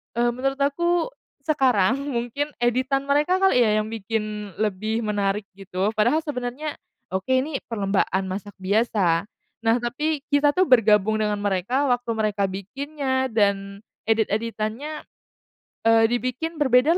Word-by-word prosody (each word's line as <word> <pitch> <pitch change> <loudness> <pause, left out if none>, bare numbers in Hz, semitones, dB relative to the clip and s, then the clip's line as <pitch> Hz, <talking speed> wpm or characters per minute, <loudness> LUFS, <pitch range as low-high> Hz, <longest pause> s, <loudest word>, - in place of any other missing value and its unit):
eee, 240 0 +2
menurut 270 +3 -1
aku 345 - +1 0.4
sekarang 260 -8 +3
mungkin 260 +3 -2
editan 255 +3 +1
mereka 295 +6 +2
kali 385 -9 +4
ya, 215 -1 +3
yang - - -7
bikin 210 -2 -4
lebih 215 +2 -1
menarik 205 -1 0 0.2
gitu, 195 +2 -1
padahal 240 +9 +2
sebenarnya, 285 +1 -4 0.4
oke 190 +7 -2
ini 270 +1 0
perlombaan 195 -3 0
masak 205 +1 -6
biasa. 200 -3 +1 0.4
Nah, 225 0 +4
tapi 290 +5 -1
kita 290 0 +3
tuh 370 - +4
bergabung 220 -3 +4
dengan 210 -1 +1
mereka 205 +7 0
waktu 245 -1 0
mereka 210 -2 0
bikinnya 260 +7 -2
dan 200 -2 0 0.2
edit-editannya, 225 +6 -1 0.8
eee, 225 0 +5
dibikin 255 +7 -2
berbeda 285 +3 +4
230 Hz, 125 wpm, -24 LUFS, 210-275 Hz, 0.8 s, eee